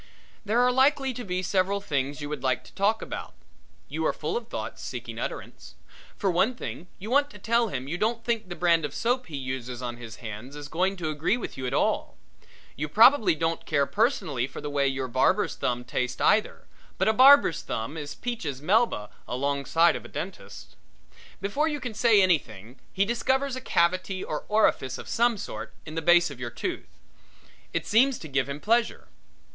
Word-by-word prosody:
There 220 +3 +1
are 250 0 +4
likely 270 +1 +3
to 245 - -6
be 185 -3 -2
several 195 +2 +1
things 145 -6 -2
you 145 - -5
would 150 -3 -4
like 130 -1 0
to - - -17
talk 210 +3 +1
about. - - -7 0.5
You - - -3
are - - +1
full - - -3
of 475 - -3
thoughts - - -6
seeking - - -6
utterance. - - -7 0.4
For 195 -3 +1
one 195 +8 +2
thing 180 -6 -7
you 215 +5 -7
want 285 +2 +3
to - - -12
tell 235 +1 +1
him 135 -8 -4
you 175 +5 -3
don't 230 +2 0
think 225 -4 -1
the 175 - -5
brand 170 -2 +3
of 145 -2 -4
soap 250 +2 0
he 150 -4 -6
uses 130 -2 -5
on 120 -1 -5
his 115 -2 -9
hands 115 +4 -8
is 145 -1 -7
going 185 +4 0
to 160 -3 -2
agree 155 +9 0
with 245 - -6
you 130 - -4
at - - -3
all. - - 0 0.6
You 150 +1 -3
probably 225 - +6
don't 165 +1 -1
care 140 -1 +2
personally 160 - 0
for - - -9
the 145 - -5
way 140 -1 +2
your 135 -1 -2
barber's 130 - +2
thumb 125 0 -2
tastes 125 0 -3
either, 215 - +2 0.3
but - - +1
a 220 - +4
barber's 260 - +7
thumb 115 +7 -4
is 150 -2 -6
Peaches 170 - -4
Melba 185 - +2 0.2
alongside 140 +5 +2
of - - -6
a - - -9
dentist's. 190 +2 -8 0.6
Before 240 +11 0
you 295 -2 -2
can 245 -4 -5
say 215 -2 +5
anything 120 - 0
though - - -29
he 195 - +2
discovers 260 +4 0
a 260 - -5
cavity 185 -2 +1
or 150 - -4
orifice 210 -11 +2
of - - -9
some 235 -1 +2
sort 200 - -7
in 155 - -8
the 165 - -2
base 175 -1 +5
of 135 - -10
your 120 -1 -4
tooth. 120 - -5 0.8
It - - -2
seems 250 +4 +4
to 160 - -9
give 140 -1 0
him 140 +1 -4
pleasure. 230 +6 +1
175 Hz, 200 wpm, -27 LUFS, 140-230 Hz, 0.8 s, barber's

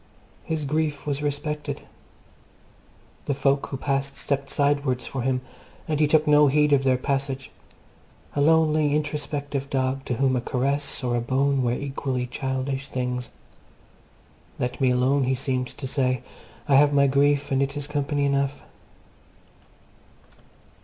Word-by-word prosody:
His 160 -2 -2
grief 150 0 -1
was 145 -1 -2
respected. 150 +1 -3 1.5
The 140 - 0
folk 140 0 +1
who 135 - -5
passed 135 0 -2
stepped 140 -1 -2
sidewards 140 -3 +1
for 135 - -4
him, 125 0 0 0.5
and 155 -2 -1
he 150 - +4
took 155 +1 +3
no 150 0 +6
heed 150 +1 +3
of 135 -1 +4
their 130 -1 +3
passage 135 0 -2 0.8
a 145 - +1
lonely, 155 -1 +3
introspective 145 -2 -3
dog 135 0 -1
to 125 - -1
whom 130 +1 +2
a 125 - 0
caress 140 +3 -1
or 120 -1 0
a 120 - 0
bone 135 +3 +1
were 120 -1 +1
equally 135 -1 -2
childish 135 +2 -3
things: 125 -1 -3 1.3
Let 125 +2 -3
me 130 - +4
alone, 130 +2 +2
he 130 +1 +1
seemed 130 -1 -1
to 135 - -8
say, 130 -2 0 0.4
I 140 -2 +5
have 145 +1 +5
my 140 0 +5
grief, 140 +1 +2
and 135 0 +2
it 140 +1 -1
is 145 - -3
company 145 -1 -1
enough. 140 0 0
140 Hz, 145 wpm, -25 LUFS, 130-145 Hz, 1.5 s, no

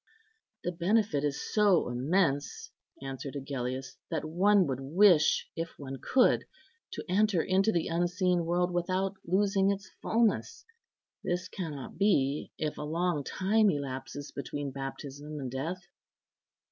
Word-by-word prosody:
"The 175 - -1
benefit 180 -3 +1
is 145 -2 -1
so 205 -5 +4
immense," 140 +4 0 0.3
answered 135 +1 -6
Agellius, 130 -2 -4
"that - - -2
one 190 +5 +4
would 135 -3 -2
wish, 165 +4 +4
if 165 0 -5
one 135 -2 -7
could, 255 -1 +3 0.5
to - - -6
enter 195 -1 +2
into 195 +3 +3
the 170 -5 0
unseen 175 +1 +1
world 175 +1 +1
without 185 +2 0
losing 195 +1 +2
its 200 -1 -3
fulness. 225 -1 +1 0.6
This 180 +1 -1
cannot 155 -9 -6
be, 145 -8 +2
if 155 -1 -3
a - - -3
long 160 0 -1
time 210 +7 +2
elapses 140 -1 -4
between 140 0 -4
baptism 140 +2 -6
and 130 -3 -4
death." 165 +8 -4
170 Hz, 130 wpm, -30 LUFS, 140-190 Hz, 0.6 s, so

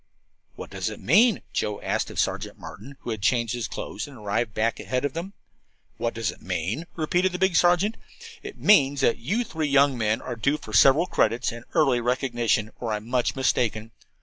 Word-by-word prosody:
"What - - -9
does - - -3
it - - -8
mean?" 215 - +4
Joe 105 -1 -2
asked - - -1
of - - -10
Sergeant - - -2
Martin, 140 0 -11
who 120 - -5
had 110 -2 -4
changed 115 +1 +1
his 120 -2 -3
clothes - - -6
and 140 -3 -12
arrived 105 +1 -2
back 115 +1 0
ahead 130 +1 -2
of 145 - -2
them. 175 +5 -6 0.6
"What 115 0 -2
does 115 0 -1
it - - -16
mean?" 95 - -3
repeated 175 +3 0
the - - -2
big 190 -1 +1
sergeant. 175 +6 +3 0.4
"It 405 0 -9
means 140 -9 +4
that 120 - +2
you 205 - -1
three 160 -8 -3
young 140 -1 +4
men 110 -2 0
are 125 - -6
due 140 +6 0
for 110 -7 -11
several 135 +9 +6
credits 120 -8 +1
and 120 +1 -10
early 135 -7 +3
recognition, 120 -3 0
or 115 -3 -2
I'm 105 +1 -5
much 125 0 0
mistaken. 115 -4 0
125 Hz, 200 wpm, -25 LUFS, 115-160 Hz, 0.6 s, several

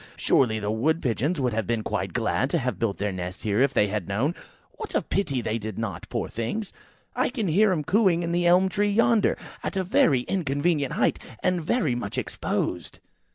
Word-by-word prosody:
Surely 110 -5 +2
the 105 -1 -2
Wood 150 +9 +1
pigeons 140 +7 -1
would 125 -3 0
have 110 -2 -1
been 115 -2 0
quite - - -2
glad - - 0
to - - +1
have - - -2
built 110 -4 -1
their 100 0 -1
nests 90 0 -6
here 105 +2 +1
if 140 0 +4
they 105 - +3
had 105 -3 -3
known. 120 - 0 0.4
What - - -7
a - - +3
pity 140 -11 -1
they 110 0 -2
did 110 -2 -6
not, 105 -7 -5
poor - - -2
things! 150 - -4 0.4
I - - +2
hear 215 - +2
them 170 -5 0
cooing 185 -1 +3
in 170 - -2
the 175 0 +2
elm 180 +2 +5
tree 205 +2 +1
yonder, 225 +1 +3 0.2
at - - -3
a 190 - +1
very 185 - +3
inconvenient 145 -2 0
height, - - +1 0.2
and 180 -2 +1
very 160 - +1
much 120 -1 -4
exposed." 90 -7 -3
140 Hz, 200 wpm, -25 LUFS, 110-185 Hz, 0.4 s, elm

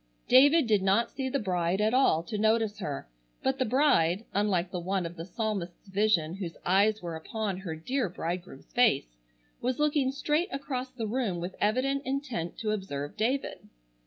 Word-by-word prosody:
David 285 +5 +6
did 210 -3 +3
not 195 +5 +2
see 265 -1 -3
the 280 - 0
bride 180 -5 0
at 215 +2 +2
all 250 -11 +4
to 215 - -6
notice 220 -1 +2
her, 145 - -4 0.4
but 265 +1 0
the 260 - +2
bride, 225 - +3
unlike 190 -3 +1
the 180 - -3
one 185 +1 -1
of 170 +1 -6
the 165 -1 -6
psalmist's 200 -3 -4
vision 195 -5 +2
whose 175 -4 -6
eyes 205 +3 +3
were 170 -2 -4
upon 200 +4 -3
"her 180 -4 -5
dear 240 - -1
bridegroom's 170 - -6
face," - - +3 0.5
was 250 +1 0
looking 295 -3 +2
straight 300 +6 0
across 265 -2 -3
the 250 -3 -5
room 215 -5 -1
with 175 +2 -5
evident 260 +6 +1
intent 260 - -3
to 215 -2 -1
observe 145 -9 -4
David. 255 +5 -2
210 Hz, 175 wpm, -29 LUFS, 175-255 Hz, 0.5 s, David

